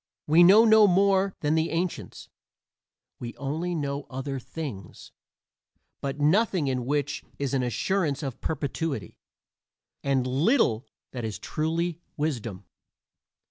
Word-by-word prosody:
We 160 +3 +5
know 205 +6 +8
no 220 -1 +7
more 195 +1 +3
than 150 0 +1
the 160 +1 +1
ancients; 170 +1 -4 0.9
we 120 -1 -6
only 160 +6 -3
know 140 -2 -3
other 135 +1 -4
things, 125 - -8 0.9
but 140 +1 -4
nothing 175 +1 +2
in 125 -2 -2
which 145 0 -1
is 140 -1 -2
an 135 - +2
assurance 150 - -1
of 135 -4 -5
perpetuity, 145 - -3 0.8
and 135 -2 +1
little 130 - +2 0.2
that 125 -2 -5
is 110 -2 -4
truly 165 +2 -2 0.2
wisdom. 115 -11 -3
145 Hz, 120 wpm, -26 LUFS, 130-175 Hz, 0.9 s, know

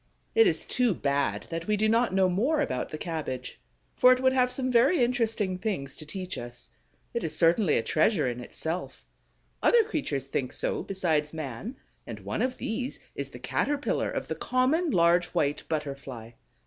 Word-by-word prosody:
It 455 0 +6
is - - 0
too 245 -6 +2
bad 140 -1 0
that 165 0 -4
we 210 0 +2
do 215 +1 +2
not 230 +1 +3
know 190 0 +3
more 240 - +1
about 250 - -1
the 155 - -5
cabbage, 150 -6 -5 0.3
for 250 - +7
it 255 - +4
would 260 0 +3
have 250 -1 +3
some 255 0 -1
very 245 +8 +4
interesting 225 -6 0
things 180 -11 -3
to 155 - -11
teach 185 +3 -5
us. 120 0 -9 0.4
It 235 - -2
is 160 - -1
certainly 170 0 +4
a - - 0
treasure 155 - +2
in 120 0 -3
itself. 160 +8 -5 0.6
Other 470 -1 +5
creatures 275 - -2
think 135 -2 -3
so - - -1
besides 160 -6 0
man; 155 - -5 0.3
and - - -6
one - - -3
of 255 0 -1
these 250 +4 -3
is - - -5
the - - -10
Caterpillar 290 0 -1
of - - -4
the - - -2
common 275 +7 +1
Large 175 - +4
White 145 0 +1
Butterfly. 140 -7 -4
185 Hz, 180 wpm, -28 LUFS, 150-250 Hz, 0.6 s, for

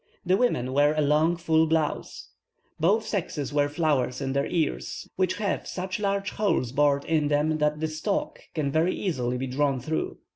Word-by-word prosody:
The 180 +1 +4
women 130 - +1
wear 145 +2 +4
a 155 - +2
long 155 +4 +3
full 160 -1 +2
blouse. 160 -1 -2 0.5
Both 205 +8 +2
sexes 160 -9 -3
wear 145 0 +2
flowers 145 -5 0
in 135 -1 -2
their 140 0 0
ears, 165 -4 -2
which 185 -1 +1
have 205 -4 -2
such 185 +2 -4
large 200 -1 -1
holes 200 - 0
bored 140 0 +2
in 155 -2 +1
them 150 +2 +1
that 150 0 +1
the 160 - 0
stalk 225 - -2 0.2
can 145 -3 0
very 160 +5 +2
easily 125 -10 -1
be 130 - -2
drawn 135 +1 0
through. 155 +6 -3
155 Hz, 180 wpm, -26 LUFS, 145-180 Hz, 0.5 s, The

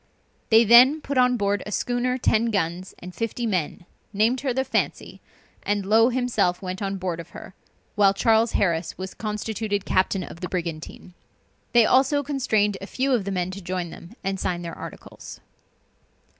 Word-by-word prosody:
They 225 +1 +6
then 245 +7 +7
put 280 -3 -2
on 250 0 +3
board 200 -2 0
a 210 - -8
schooner 245 +4 -1
ten 230 -2 +2
guns 185 -3 -2
and 180 +1 -10
fifty 230 +3 -3
men, 180 -4 -2 0.3
named 225 +5 +1
her 275 -2 -1
the 265 +2 0
Fancy, - - -3 0.4
and 205 -1 -1
Low 225 +4 +4
himself 235 -8 0
went 185 0 -6
on 195 -1 -2
board 180 -3 -3
of 170 - -9
her, - - -11 0.4
while 200 -2 +4
Charles 225 +3 +2
Harris 170 -3 0
was 185 0 -6
constituted 210 -1 -3
captain 185 0 +1
of 170 - -10
the 180 - -5
brigantine. 170 0 -6 0.6
They 235 -2 +6
also 275 +4 +3
constrained 220 -8 0
a 195 - -7
few 265 +4 -1
of 235 -7 +1
the 200 - -3
men 180 -1 -2
to 195 +1 -8
join 180 -1 -4
them, 175 +7 -12
and 195 0 -2
sign 175 -1 -2
their 170 -1 -6
articles. - - -10
205 Hz, 175 wpm, -24 LUFS, 185-235 Hz, 0.6 s, then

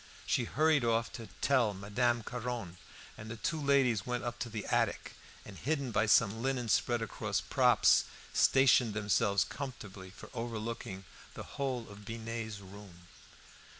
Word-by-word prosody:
She 120 - +1
hurried 155 +1 +2
off 115 0 +1
to 115 -2 -8
tell 125 -7 +2
Madame 115 +4 0
Caron, 120 -7 -5 0.4
and 110 +1 -8
the 115 - -5
two 155 +7 -2
ladies 135 -7 +3
went 125 +2 -3
up 120 0 -4
to 120 - -3
the 110 -2 -5
attic, - - 0 0.3
and, - - -10
hidden 140 -4 -1
by 110 - +2
some 110 +1 +4
linen 125 -2 -1
spread 120 +2 +2
across 115 - -2
props, - - +4 0.3
stationed 125 -5 +4
themselves 100 -1 +2
comfortably 105 -9 -8
for 95 - -13
overlooking 115 -4 -5 0.3
the - - -6
whole 130 -4 -3
of 105 0 -12
Binet's 115 -1 -5
room. 95 -3 -13
115 Hz, 150 wpm, -32 LUFS, 105-125 Hz, 0.4 s, some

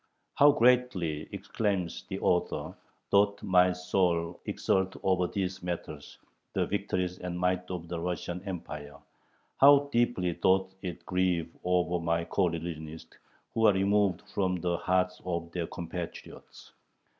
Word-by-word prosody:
"How 145 +1 +7
greatly," 115 - +2
exclaims 100 -6 -2
the - - -3
author, 90 -1 0 0.4
"doth 100 0 +3
my 90 -1 +4
soul 90 -2 0
exult 95 0 0
over 90 -2 +2
these 95 0 -3
matters 85 -4 -6 0.4
[the - - +1
victories 90 -2 -2
and 90 -1 -4
might 90 0 0
of 90 -2 -5
the 85 0 -4
Russian 90 +1 -3
Empire]; 75 -6 -6 0.6
how 140 +1 +7
deeply 115 -8 +1
doth 95 +2 +2
it 90 -3 -6
grieve 90 -3 0
over 90 -1 +1
my 85 0 0
coreligionists, 80 -4 -3 0.4
who 115 -1 +4
are 105 - +6
removed 100 -1 +2
from 95 -2 +1
the 90 0 -1
hearts 90 +1 0
of 85 -2 -3
their 85 -2 -3
compatriots." 85 0 -8
90 Hz, 130 wpm, -29 LUFS, 85-95 Hz, 0.6 s, How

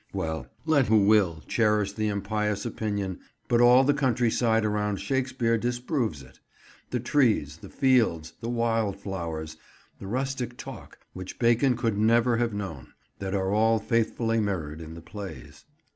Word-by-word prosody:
Well, 80 -8 -3 0.2
let 145 -5 +3
who 105 -2 +4
will 100 -7 +3
cherish 105 -3 +1
the 110 -1 -1
impious 105 0 -1
opinion; 100 -4 -3 0.3
but 120 0 +3
all 125 +2 +7
the 145 +2 +3
countryside 120 -4 +1
around 105 -1 0
Stratford 130 -2 0
disproves 120 - -2
it; 65 - -18 0.5
the 125 - -1
trees, 115 - +1
the - - -12
fields, 115 - +2
the 115 - -4
wild 115 -4 0
flowers, 80 -5 -5 0.4
the 95 - -8
rustic 125 +1 -3
talk, - - -10 0.2
which 95 0 -8
Bacon 120 +1 +3
could 115 -4 -1
never 115 +2 +3
have 120 -1 0
known, 95 -9 -6 0.3
that 95 0 -3
are 95 0 0
all 110 +1 +3
faithfully 115 0 0
mirrored 85 -7 -3
in 80 0 -9
the 85 - -9
plays. 95 +3 -9
110 Hz, 150 wpm, -27 LUFS, 95-120 Hz, 0.5 s, all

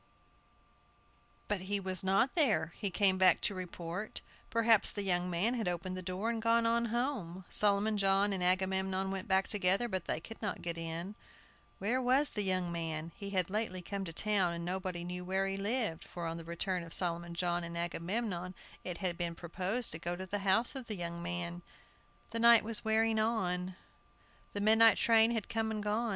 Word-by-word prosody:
But 205 -3 -1
he 200 +2 -2
was 185 -2 0
not 195 +7 +2
there! 205 - +2
He 200 - -2
came 190 0 +3
back 185 -2 +6
to 205 - +1
report. 180 +2 -6 0.3
Perhaps 230 -2 +4
the 205 - -4
young 180 -1 +1
man 180 +7 +1
had 225 -6 -2
opened 180 +1 -2
the 185 - -4
door 185 +5 -2
and 230 -1 -3
gone 230 +1 +3
on 235 +1 +2
home. 230 -7 -3
Solomon 210 +1 +3
John 195 +1 +3
and 185 -2 -2
Agamemnon 190 +1 +1
went 195 +3 -4
back 190 -1 +2
together, 200 +2 +2
but 190 -5 -3
they - - -1
could 225 +7 -11
not 210 - -3
get 170 -1 -2
in. 165 +3 -5 0.6
Where 235 +7 0
was 260 +4 +3
the 210 - -3
young 185 -3 0
man? 165 -1 -4
He 200 -1 -7
had 185 -2 0
lately 205 -4 -2
come 200 +2 -4
to 165 - -5
town, 190 0 +2
and 170 0 -5
nobody 180 -1 -3
knew 180 +1 -5
where 190 +1 0
he 195 0 -2
lived, 205 -3 -2
for 175 -1 -7
on 165 0 -3
the 165 - -7
return 180 +2 -2
of 165 -1 -3
Solomon 170 -1 0
John 175 0 0
and 170 0 -5
Agamemnon 180 +2 -3 0.3
it 180 -2 -3
had 180 -3 -3
been 170 -1 -2
proposed 185 +8 -2
to 160 - -3
go 175 +1 -3
to 185 +1 -6
the 205 +2 -3
house 200 +6 +2
of 265 -4 -6
the 215 - -2
young 170 -1 -5
man. 175 0 -4 0.7
The 230 - -2
night 235 -1 +7
was 225 0 -1
wearing 220 0 +2
on. 185 -5 -1 0.8
The 205 - -2
midnight 220 +1 +6
train 225 -1 +5
had 225 -3 -2
come 225 -1 -1
and 215 -1 -3
gone. 220 +3 0
190 Hz, 195 wpm, -33 LUFS, 175-220 Hz, 0.8 s, night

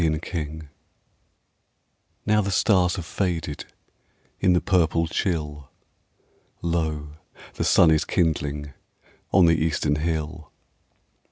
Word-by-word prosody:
At 80 -1 +1
Sunrise 80 -2 -4 1.6
Now 105 0 +3
the 100 - -2
stars 90 -2 +3
have 85 - -5
faded 80 -6 -3 0.7
In 95 -2 +3
the 90 - +4
purple 85 -4 +2
chill, 75 -5 -3 0.9
Lo, 80 -3 -2 0.4
the - - -3
sun 80 - +5
is 80 0 +3
kindling 75 -5 -1 0.6
On 95 -3 +6
the 80 -1 +3
eastern 75 -2 0
hill. 80 0 -3
80 Hz, 105 wpm, -24 LUFS, 75-90 Hz, 1.6 s, On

